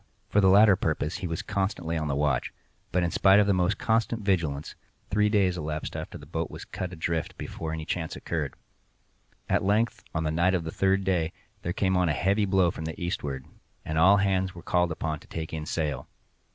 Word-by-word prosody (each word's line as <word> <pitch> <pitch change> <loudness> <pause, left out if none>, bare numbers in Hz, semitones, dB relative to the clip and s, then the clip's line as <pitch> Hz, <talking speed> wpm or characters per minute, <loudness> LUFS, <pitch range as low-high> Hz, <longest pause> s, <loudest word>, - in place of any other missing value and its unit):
For 105 - +3
the 95 - +5
latter 100 +1 +7
purpose 80 -2 -1
he 90 - -4
was 85 +4 -3
constantly 95 -4 -2
on 80 -1 -1
the 70 - 0
watch; 70 -3 0 0.4
but, 90 - +2
in 85 - 0
spite 95 +1 +5
of 105 - +5
the 100 - +3
most 90 +2 +1
constant 115 0 0
vigilance, 80 -7 0 0.4
three 105 +1 +3
days 95 -4 +2
elapsed 75 0 -4
after - - -5
the - - -12
boat - - -3
was - - -9
cut 90 -1 -5
adrift 85 -2 -3
before 80 -1 -5
any 80 -1 -4
chance 80 -1 -3
occurred. 75 -5 -3 0.9
At - - +1
length, 105 +4 +1
on 80 - 0
the 80 - 0
night 85 +4 +2
of 85 - -1
the 80 - -4
third 95 +2 +2
day, 85 -4 0 0.3
there 85 - -2
came 95 0 +1
on 90 -2 +2
a - - +2
heavy 100 +6 +2
blow 95 -3 +3
from 80 - -6
the 80 - -5
eastward, 70 -6 -3 0.4
and 80 0 -1
all 95 +5 +7
hands 95 -2 +1
were 85 - -10
called 90 -1 +1
up 80 -1 -3
to - - -18
take 80 -1 -5
in 80 -1 -4
sail. 75 -4 -2
90 Hz, 215 wpm, -27 LUFS, 80-95 Hz, 0.9 s, latter